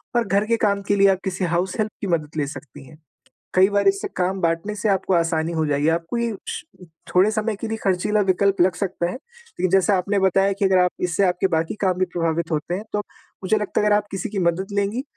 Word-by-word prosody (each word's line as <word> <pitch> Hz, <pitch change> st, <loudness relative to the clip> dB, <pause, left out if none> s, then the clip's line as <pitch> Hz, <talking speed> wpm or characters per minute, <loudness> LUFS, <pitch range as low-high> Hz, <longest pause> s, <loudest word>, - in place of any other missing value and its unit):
और 240 Hz, -1 st, +2 dB
घर 200 Hz, +2 st, +2 dB
के 230 Hz, 0 st, +2 dB
काम 200 Hz, -2 st, +1 dB
के 205 Hz, -, +2 dB
लिए 200 Hz, 0 st, +5 dB
आप 190 Hz, -, -1 dB
किसी 190 Hz, -1 st, -2 dB
हाउस 180 Hz, +1 st, -1 dB
हेल्प 215 Hz, 0 st, 0 dB
की 200 Hz, -, -2 dB
मदद 155 Hz, -4 st, -1 dB
ले 145 Hz, -2 st, 0 dB
सकती 140 Hz, -1 st, -10 dB
हैं। 155 Hz, -, -15 dB, 0.6 s
कई 190 Hz, +1 st, +6 dB
बार 200 Hz, -1 st, +3 dB, 0.3 s
काम 185 Hz, +1 st, 0 dB
बाँटने 170 Hz, +4 st, -1 dB
से 215 Hz, -, -1 dB
आपको 190 Hz, -1 st, +1 dB
आसानी 165 Hz, -1 st, +1 dB
हो 160 Hz, -1 st, 0 dB
जाएगी, 145 Hz, +1 st, +1 dB
आपको 165 Hz, +6 st, -1 dB
ये 230 Hz, -3 st, -1 dB
श 460 Hz, -4 st, -4 dB, 0.5 s
थोड़े 190 Hz, +4 st, +5 dB
समय 215 Hz, -1 st, -1 dB
के 230 Hz, -, -5 dB
लिए 225 Hz, -, -2 dB
ख़र्चीला 195 Hz, +3 st, +1 dB
विकल्प 195 Hz, 0 st, +2 dB
लग 180 Hz, 0 st, +4 dB
सकता 180 Hz, -2 st, -2 dB
है, -, -, -6 dB
लेकिन 470 Hz, -, -6 dB
जैसे 195 Hz, +1 st, +3 dB
आपने 200 Hz, +2 st, +1 dB
बताया 195 Hz, +1 st, +3 dB
कि 200 Hz, +1 st, -2 dB
अगर 190 Hz, -1 st, +4 dB
आप 180 Hz, 0 st, +3 dB, 0.2 s
इससे 185 Hz, +4 st, +1 dB
आपके 180 Hz, +1 st, +1 dB
बाकी 160 Hz, +4 st, -1 dB
काम 185 Hz, -1 st, +1 dB
भी 185 Hz, -, +3 dB
प्रभावित 165 Hz, -1 st, -1 dB
होते 155 Hz, +3 st, -1 dB
हैं 205 Hz, +4 st, -4 dB
तो, 210 Hz, -, 0 dB, 0.5 s
मुझे 215 Hz, +3 st, +2 dB
लगता 210 Hz, 0 st, -1 dB
है 210 Hz, -, +1 dB
अगर 205 Hz, 0 st, +4 dB
आप 205 Hz, 0 st, -1 dB
किसी 195 Hz, -2 st, -4 dB
की 210 Hz, -, -4 dB
मदद 175 Hz, +1 st, +1 dB
लेंगी 205 Hz, +5 st, 0 dB
190 Hz, 240 wpm, -22 LUFS, 170-205 Hz, 0.6 s, कई